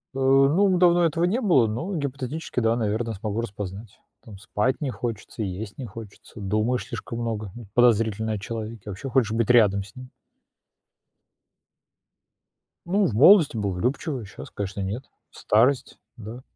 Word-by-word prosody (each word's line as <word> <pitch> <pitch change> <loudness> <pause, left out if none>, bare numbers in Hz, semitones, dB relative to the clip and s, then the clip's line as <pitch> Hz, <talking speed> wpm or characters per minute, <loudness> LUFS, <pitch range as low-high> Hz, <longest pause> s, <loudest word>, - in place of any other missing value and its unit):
Э, 135 - -3
ну, 140 +9 +4
давно 175 -1 +4
этого 165 +2 +1
не 225 +9 0
было, 140 - +4
но 160 - -4
гипотетически, 140 0 -4
да, 115 -1 +2
наверно, 115 0 -1
смогу 105 +2 -3
распознать. 105 -1 -7 0.2
Там 105 -3 -12
спать 105 - -1
не 145 - -1
хочется, 115 -2 -5
есть 100 +2 -6
не 130 - -6
хочется, 110 0 -11
думаешь 110 +5 -1
слишком 115 - -6
много 110 -4 -3 0.2
подозрительно 110 -2 +2
о 105 - -3
человеке, 110 0 -6
вообще 100 +7 -6
хочешь 125 -4 +2
быть 115 +1 0
рядом 105 -5 +4
с 100 - -16
ним. 130 0 -10 2.8
Ну, 195 +3 +2
в 125 - -1
молодости 150 - +6
был 100 -2 -1
влюбчивый, 125 - -2
щас, 95 - -11
конечно, 100 0 -5
нет. 100 +7 -4 0.3
Старость, 125 +5 +1 0.2
да. 115 +2 -9
115 Hz, 150 wpm, -24 LUFS, 105-135 Hz, 2.8 s, молодости